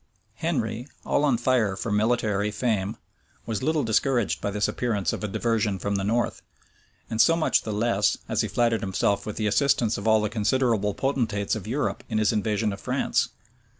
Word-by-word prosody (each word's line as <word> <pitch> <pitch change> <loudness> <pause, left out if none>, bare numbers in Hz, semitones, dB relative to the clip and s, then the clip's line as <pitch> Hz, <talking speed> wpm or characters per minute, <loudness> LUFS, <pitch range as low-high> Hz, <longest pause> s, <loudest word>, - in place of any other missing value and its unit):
Henry, 125 -6 -2 0.2
all 145 - +1
on 140 -5 +3
fire 120 -5 +1
for 105 +3 -4
military 105 -1 +1
fame, 105 -2 -1 0.5
was 110 -3 -3
little 155 +1 +1
discouraged 120 0 +1
by - - -1
this 105 +1 0
appearance 110 -6 -1
of - - -5
a - - 0
diversion 105 -1 0
from 100 +3 -2
the 100 -1 -1
north; 115 +4 0 0.7
and 110 0 +1
so 165 - +5
much 165 - +2
the 110 - -5
less, 105 -1 +1
as - - 0
he - - -1
flattered 115 -2 +1
himself 100 0 0
with 105 - -4
the 110 - -2
assistance 115 0 +2
of 100 - -4
all 110 0 +5
the 105 - 0
considerable 110 -2 +1
potentates 115 -7 -1
of 105 -2 -6
Europe 140 +6 -2
in 110 - -1
his 110 +1 +2
invasion 105 0 0
of 100 - -9
France. - - 0
110 Hz, 185 wpm, -25 LUFS, 105-120 Hz, 0.7 s, so